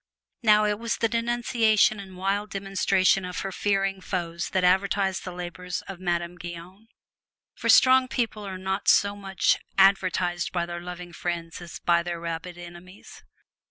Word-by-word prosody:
Now, 215 Hz, -2 st, +5 dB
it 210 Hz, 0 st, 0 dB
was 230 Hz, 0 st, -2 dB
the 230 Hz, -, +1 dB
denunciation 230 Hz, -2 st, +2 dB
and 190 Hz, -2 st, -10 dB
wild 200 Hz, +3 st, -1 dB
demonstration 195 Hz, -1 st, +1 dB
of 180 Hz, 0 st, -4 dB
her 195 Hz, -, -4 dB
fearing 195 Hz, -1 st, 0 dB
foes 170 Hz, -2 st, -3 dB
that 185 Hz, -, 0 dB
advertised 190 Hz, +1 st, +2 dB
the 180 Hz, -, -5 dB
labors 180 Hz, 0 st, -6 dB
of 195 Hz, -2 st, -9 dB
Madame 175 Hz, -1 st, -2 dB
Guyon. 175 Hz, +5 st, -9 dB, 0.7 s
For -, -, -4 dB
strong 260 Hz, 0 st, +6 dB
people 235 Hz, -5 st, -2 dB
are 190 Hz, -2 st, -6 dB
not 190 Hz, +1 st, -3 dB
so 200 Hz, 0 st, +4 dB
much 195 Hz, -2 st, +1 dB, 0.2 s
advertised 185 Hz, -2 st, +2 dB
by 175 Hz, -1 st, -1 dB
their 175 Hz, 0 st, -6 dB
loving 175 Hz, 0 st, -8 dB
friends 170 Hz, 0 st, -4 dB
as 175 Hz, -, -8 dB
by 170 Hz, -1 st, +2 dB
their 170 Hz, 0 st, -4 dB
rabid 170 Hz, +1 st, -5 dB
enemies. 175 Hz, +2 st, -12 dB
185 Hz, 160 wpm, -26 LUFS, 175-200 Hz, 0.7 s, strong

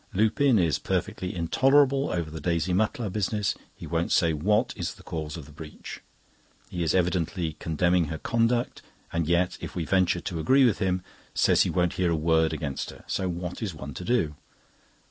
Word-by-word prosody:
Lupin 115 Hz, +5 st, +3 dB
is 85 Hz, -5 st, +2 dB
perfectly 90 Hz, 0 st, -2 dB
intolerable 135 Hz, -, +3 dB
over 85 Hz, -3 st, -2 dB
the 80 Hz, -, -7 dB
Daisy 85 Hz, 0 st, 0 dB
Mutlar 110 Hz, +2 st, 0 dB
business. 105 Hz, 0 st, 0 dB, 0.2 s
He -, -, -9 dB
won't 85 Hz, 0 st, -1 dB
say 85 Hz, -2 st, +3 dB
what 105 Hz, -, +1 dB
is 90 Hz, -5 st, -4 dB
the -, -, -16 dB
cause 80 Hz, 0 st, -5 dB
of 80 Hz, -, -8 dB
the 75 Hz, -, -14 dB
breach. 75 Hz, +1 st, -9 dB, 0.7 s
He 90 Hz, -, -3 dB
is 80 Hz, 0 st, +1 dB
evidently 90 Hz, -2 st, 0 dB
condemning 85 Hz, +2 st, +2 dB
her 80 Hz, +1 st, -4 dB
conduct, 120 Hz, +5 st, 0 dB, 0.3 s
and 85 Hz, -2 st, 0 dB
yet, 85 Hz, +2 st, +1 dB
if -, -, -7 dB
we 85 Hz, -, -2 dB
venture 95 Hz, -1 st, +2 dB
to 85 Hz, -, -4 dB
agree 130 Hz, -, +5 dB
with 115 Hz, -5 st, +2 dB
him, 95 Hz, -2 st, 0 dB, 0.3 s
says -, -, +4 dB
he -, -, +3 dB
won't 90 Hz, -2 st, +1 dB
hear 90 Hz, -, +3 dB
a 85 Hz, -, +2 dB
word 80 Hz, 0 st, +2 dB
against 75 Hz, -4 st, -3 dB
her. -, -, -12 dB
So 95 Hz, -1 st, -1 dB
what 90 Hz, +3 st, -5 dB
is 100 Hz, -7 st, -3 dB
one 70 Hz, -1 st, -7 dB
to 90 Hz, -, -7 dB
do? 115 Hz, -9 st, +1 dB
90 Hz, 190 wpm, -27 LUFS, 80-105 Hz, 0.7 s, agree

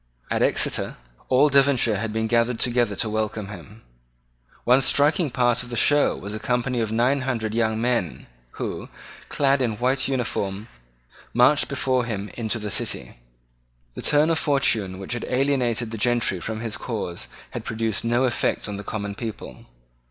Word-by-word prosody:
At -, -, +1 dB
Exeter -, -, +1 dB, 0.3 s
all 135 Hz, +4 st, +5 dB
Devonshire 135 Hz, -6 st, +3 dB
had 110 Hz, 0 st, -3 dB
been 110 Hz, +1 st, -1 dB
gathered 115 Hz, +1 st, +1 dB
together 120 Hz, -4 st, +1 dB
to 110 Hz, -, 0 dB
welcome 110 Hz, -1 st, -2 dB
him. 105 Hz, +3 st, -11 dB, 0.8 s
One 125 Hz, +2 st, +4 dB
striking 150 Hz, +5 st, +3 dB
part 120 Hz, -2 st, +2 dB
of 125 Hz, -, -9 dB
the 120 Hz, -, -4 dB
show 145 Hz, +4 st, +4 dB
was 100 Hz, +2 st, -7 dB
a 110 Hz, -, -4 dB
company 125 Hz, +2 st, -1 dB
of 110 Hz, -1 st, -2 dB
nine 125 Hz, +5 st, +2 dB
hundred 115 Hz, -5 st, -2 dB
young 110 Hz, -1 st, 0 dB
men 120 Hz, -8 st, -1 dB, 0.3 s
who, -, -, -5 dB, 0.4 s
clad 140 Hz, -1 st, +2 dB
in 120 Hz, -3 st, +1 dB
a -, -, -6 dB
white 130 Hz, +3 st, 0 dB
uniform, 110 Hz, -6 st, -2 dB, 0.7 s
marched 145 Hz, +5 st, +4 dB
before 130 Hz, -3 st, 0 dB
him 105 Hz, -3 st, -4 dB
into 115 Hz, -1 st, -2 dB
the 105 Hz, -2 st, -5 dB
city. -, -, -2 dB, 0.8 s
The -, -, -7 dB
turn 150 Hz, +2 st, +4 dB
of 160 Hz, -, +1 dB
fortune 115 Hz, -, +1 dB
which 95 Hz, +5 st, -5 dB
had 120 Hz, -, -4 dB
alienated 125 Hz, -4 st, 0 dB
the 115 Hz, -, -5 dB
gentry 120 Hz, -5 st, +1 dB
from 110 Hz, +5 st, -4 dB
his 115 Hz, -2 st, -3 dB
cause 105 Hz, -8 st, -4 dB, 0.2 s
had -, -, -5 dB
produced 110 Hz, -1 st, -2 dB
no 120 Hz, +2 st, +1 dB
effect 125 Hz, -3 st, 0 dB
on 105 Hz, -1 st, -5 dB
the 100 Hz, -, -7 dB
common 100 Hz, 0 st, -4 dB
people. 110 Hz, 0 st, -8 dB
120 Hz, 170 wpm, -24 LUFS, 110-130 Hz, 0.8 s, all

